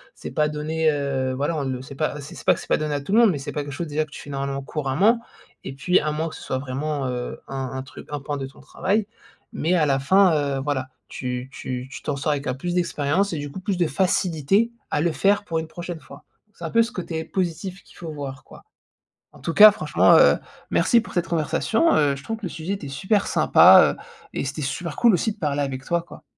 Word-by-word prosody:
c'est -, -, -8 dB
pas 150 Hz, 0 st, +1 dB
donné, 155 Hz, +1 st, 0 dB
heu, 140 Hz, -3 st, -1 dB
voilà 145 Hz, +5 st, -1 dB
on 145 Hz, -, -1 dB
le 130 Hz, -2 st, -3 dB
sait 130 Hz, +1 st, -10 dB
pas, 150 Hz, +1 st, -2 dB
c 140 Hz, +1 st, -9 dB
c'est -, -, -10 dB
pas -, -, +6 dB
que -, -, -7 dB
c'est -, -, -10 dB
pas -, -, +3 dB
donné 150 Hz, -1 st, -2 dB
à 145 Hz, -, -2 dB
tout 170 Hz, +8 st, -4 dB
le 225 Hz, -, +6 dB
monde, 230 Hz, -4 st, +6 dB
mais 155 Hz, -, -2 dB
c'est 135 Hz, -, -6 dB
pas 150 Hz, -, -2 dB
quelque 145 Hz, -, -7 dB
chose, 165 Hz, +5 st, -4 dB
déjà, 155 Hz, +1 st, 0 dB
que 155 Hz, -, -14 dB
tu -, -, -9 dB
fais -, -, -11 dB
normalement, 140 Hz, 0 st, -3 dB
couramment, 155 Hz, -, +1 dB, 0.4 s
et 135 Hz, -, -6 dB
puis, 180 Hz, +7 st, +2 dB
à 155 Hz, 0 st, -1 dB
moins 155 Hz, +2 st, -2 dB
que 160 Hz, -, -8 dB
ce -, -, -10 dB
soit 130 Hz, -, -2 dB
vraiment, 140 Hz, +2 st, -3 dB
heu, 125 Hz, -1 st, -4 dB
un 135 Hz, -1 st, -4 dB
un 130 Hz, 0 st, -4 dB
truc 130 Hz, -, -12 dB
un 145 Hz, -, -3 dB
pan 145 Hz, +1 st, -4 dB
de 135 Hz, -, -4 dB
ton 135 Hz, -, -13 dB
travail, 200 Hz, +3 st, -1 dB, 0.5 s
mais 165 Hz, +3 st, 0 dB
à 160 Hz, -4 st, +3 dB
la 135 Hz, -2 st, +2 dB
fin, 190 Hz, +6 st, +4 dB, 0.2 s
heu, -, -, -2 dB
voilà, 135 Hz, -3 st, -2 dB, 0.2 s
tu 125 Hz, 0 st, -5 dB
tu 125 Hz, 0 st, -5 dB
tu 130 Hz, -, -9 dB
t'en 145 Hz, -, -2 dB
sors 150 Hz, +2 st, 0 dB
avec 140 Hz, -1 st, -4 dB
un 125 Hz, -, 0 dB
plus 175 Hz, +6 st, -3 dB
d'expérience 175 Hz, +2 st, 0 dB
et, 165 Hz, -, -3 dB
du 145 Hz, 0 st, -5 dB
coup, 190 Hz, -, -7 dB
plus 190 Hz, 0 st, -1 dB
de 175 Hz, -2 st, +2 dB
facilité 185 Hz, +5 st, +1 dB, 0.2 s
à -, -, +1 dB
le 170 Hz, +1 st, +2 dB
faire 200 Hz, +7 st, +2 dB
pour 165 Hz, -3 st, -1 dB
une 160 Hz, -, -5 dB
prochaine 175 Hz, +1 st, -7 dB
fois. -, -, -14 dB, 0.3 s
C'est 170 Hz, -, -9 dB
un 160 Hz, -, -4 dB
peu 230 Hz, -, +5 dB
ce 230 Hz, +1 st, -1 dB
côté 170 Hz, -6 st, -4 dB
positif 185 Hz, +2 st, -3 dB
qu'il -, -, -20 dB
faut 165 Hz, -2 st, -7 dB
voir, 135 Hz, -3 st, -7 dB
quoi. -, -, -15 dB, 0.7 s
En -, -, -16 dB
tout 165 Hz, -, -3 dB
cas, 215 Hz, 0 st, +10 dB
franchement, -, -, +3 dB
heu, -, -, +6 dB, 0.3 s
merci 235 Hz, -, +4 dB
pour -, -, -11 dB
cette 175 Hz, -2 st, 0 dB
conversation, 195 Hz, -, +1 dB
heu. 145 Hz, -2 st, +3 dB
Je 140 Hz, -, -10 dB
trouve 225 Hz, -, -4 dB
que 220 Hz, -, -10 dB
le -, -, -1 dB
sujet 165 Hz, +4 st, -4 dB
était 195 Hz, -7 st, -7 dB
super 190 Hz, +9 st, 0 dB
sympa, -, -, +6 dB
heu, -, -, -13 dB, 0.3 s
et -, -, -2 dB
c'était 140 Hz, +3 st, -4 dB
super 150 Hz, +4 st, -3 dB
cool 235 Hz, -2 st, +5 dB
aussi 215 Hz, +5 st, +1 dB
de -, -, -21 dB
parler 145 Hz, -3 st, 0 dB
avec 135 Hz, -1 st, -4 dB
toi, 170 Hz, +2 st, 0 dB
quoi. 170 Hz, -, -14 dB
150 Hz, 260 wpm, -23 LUFS, 140-180 Hz, 0.7 s, cas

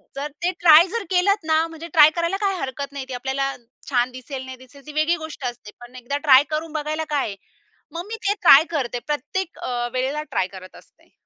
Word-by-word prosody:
जर 280 Hz, +2 st, -3 dB, 0.2 s
ते 360 Hz, -, +2 dB
ट्राय 335 Hz, +1 st, +7 dB
जर 460 Hz, +3 st, -3 dB
केलत 375 Hz, +1 st, +2 dB
ना? 315 Hz, -1 st, +3 dB
म्हणजे 330 Hz, 0 st, -9 dB
ट्राय 305 Hz, -2 st, +8 dB
करायला 340 Hz, +3 st, -1 dB
काही 390 Hz, -1 st, 0 dB
हरकत 270 Hz, +1 st, -5 dB
नाही. 270 Hz, -2 st, -5 dB
ती -, -, -5 dB
आपल्याला 270 Hz, +2 st, -2 dB, 0.4 s
छान 250 Hz, -1 st, +1 dB
दिसेल, 260 Hz, +1 st, -8 dB
नाही 260 Hz, 0 st, -9 dB
दिसेल 260 Hz, +2 st, -17 dB
ती 305 Hz, -, -9 dB
वेगळी 310 Hz, +3 st, +2 dB
गोष्ट 295 Hz, -4 st, -8 dB
असते. 240 Hz, -3 st, -6 dB
पण 240 Hz, +1 st, -14 dB
एकदा 255 Hz, +3 st, -4 dB
ट्राय 265 Hz, +1 st, +8 dB
करून 310 Hz, +1 st, -3 dB
बघायला 310 Hz, +1 st, -2 dB
काय 290 Hz, -5 st, 0 dB
आहे? 200 Hz, -, -6 dB, 0.6 s
मग 340 Hz, +2 st, -6 dB
मी 450 Hz, -, -5 dB
ते 405 Hz, -, +3 dB
ट्राय 295 Hz, -4 st, +8 dB
करते 255 Hz, -7 st, -2 dB
प्रत्येक 300 Hz, +5 st, -3 dB
अ, 240 Hz, -1 st, -3 dB
वेळेला 270 Hz, +4 st, -1 dB
ट्राय 185 Hz, -, 0 dB
करत 185 Hz, 0 st, -12 dB
असते. -, -, -20 dB
285 Hz, 215 wpm, -22 LUFS, 255-325 Hz, 0.6 s, ट्राय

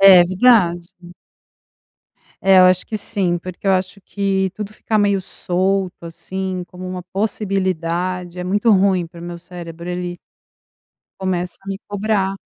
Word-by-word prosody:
É 190 Hz, -2 st, +9 dB
verdade. 180 Hz, -3 st, +3 dB, 1.5 s
É, 190 Hz, -1 st, +6 dB
eu -, -, +8 dB
acho 185 Hz, 0 st, +4 dB
que 215 Hz, -, -3 dB
sim, 190 Hz, -4 st, +1 dB
porque 185 Hz, +3 st, -9 dB
eu -, -, +5 dB
acho 185 Hz, +1 st, -1 dB
que 195 Hz, -1 st, 0 dB
tudo 210 Hz, 0 st, -6 dB
ficar 215 Hz, 0 st, -1 dB
meio 200 Hz, -2 st, +2 dB
solto, 185 Hz, 0 st, -1 dB
assim, 185 Hz, +2 st, -4 dB
como 185 Hz, 0 st, -8 dB
uma 185 Hz, -1 st, -5 dB
possibilidade, 185 Hz, -3 st, -2 dB
é -, -, -3 dB
muito 205 Hz, +5 st, +2 dB
ruim 190 Hz, -3 st, +3 dB
para 170 Hz, 0 st, -13 dB
o -, -, -8 dB
meu 175 Hz, 0 st, -6 dB
cérebro, 170 Hz, -1 st, -9 dB
ele 180 Hz, 0 st, -4 dB, 1.0 s
começa 180 Hz, -1 st, -2 dB
a 195 Hz, -, -16 dB
me 195 Hz, 0 st, -4 dB
cobrar. 205 Hz, -1 st, 0 dB
185 Hz, 150 wpm, -20 LUFS, 180-195 Hz, 1.5 s, É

